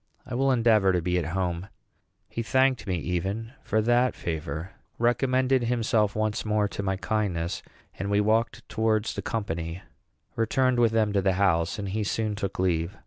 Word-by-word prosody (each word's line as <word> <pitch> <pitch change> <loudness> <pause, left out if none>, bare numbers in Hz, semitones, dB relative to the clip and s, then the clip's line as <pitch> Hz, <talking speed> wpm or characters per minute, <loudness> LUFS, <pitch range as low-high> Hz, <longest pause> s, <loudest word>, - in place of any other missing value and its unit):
I - - -8
will 135 +2 +2
endeavor 115 -5 +4
to 90 - +2
be 90 0 +1
at 80 - -3
home." 90 0 -2 0.6
He 115 - -4
thanked 130 +1 +2
me 95 - 0
even 95 - -3
for 110 +1 0
that 120 +2 +3
favor, 80 +1 -4 0.3
recommended 130 +1 +2
himself 115 -3 +1
once 110 0 -1
more 105 -1 +1
to - - -4
my 95 -1 -1
kindness, 95 -4 -1 0.4
and 100 +2 -2
we 100 0 +3
walked 110 +3 +1
towards 110 -1 0
the - - -4
company, 85 -5 -3 0.5
returned 125 +2 +2
with 115 -2 +4
them 110 -2 +2
to 100 - +2
the 95 0 +2
house, 90 +1 +2
and 100 -1 -4
he 105 +3 -1
soon 110 +1 -1
took 100 -2 -4
leave. 90 +1 0
105 Hz, 175 wpm, -27 LUFS, 95-115 Hz, 0.6 s, endeavor